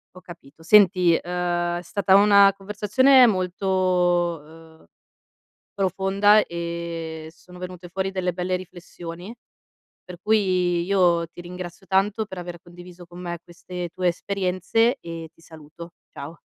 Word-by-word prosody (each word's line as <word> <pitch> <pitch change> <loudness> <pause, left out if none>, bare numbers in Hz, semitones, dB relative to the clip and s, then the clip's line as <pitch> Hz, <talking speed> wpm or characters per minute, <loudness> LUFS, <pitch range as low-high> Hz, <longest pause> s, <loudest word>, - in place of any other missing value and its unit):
Ho 185 - -13
capito, 165 -3 -15
senti, 180 -2 +5
uhm, 175 0 -2
è - - -8
stata 195 +2 0
una 200 0 +6
conversazione 215 +7 +4
molto, 180 -4 0 0.3
ehm, - - -22 0.9
profonda 195 +2 +2
e 170 -2 -6
sono 180 +1 -16
venute 180 -1 -8
fuori 190 +2 -3
delle 185 -2 -2
belle 180 +1 -2
riflessioni, 175 +1 -10 0.7
per 180 -1 -11
cui 185 -5 +1
io 175 -3 +2
ti 170 - -13
ringrazio 175 +1 -9
tanto 200 +3 0
per 190 - -10
aver 175 -1 -7
condiviso 175 0 -14
con 175 +1 -13
me 175 -1 -5
queste 175 +1 -8
tue 185 -1 0
esperienze 195 +7 0
e 165 -1 -8
ti - - -26
saluto. 160 +1 -13 0.2
Ciao. 155 +4 -9
180 Hz, 130 wpm, -23 LUFS, 170-195 Hz, 0.9 s, una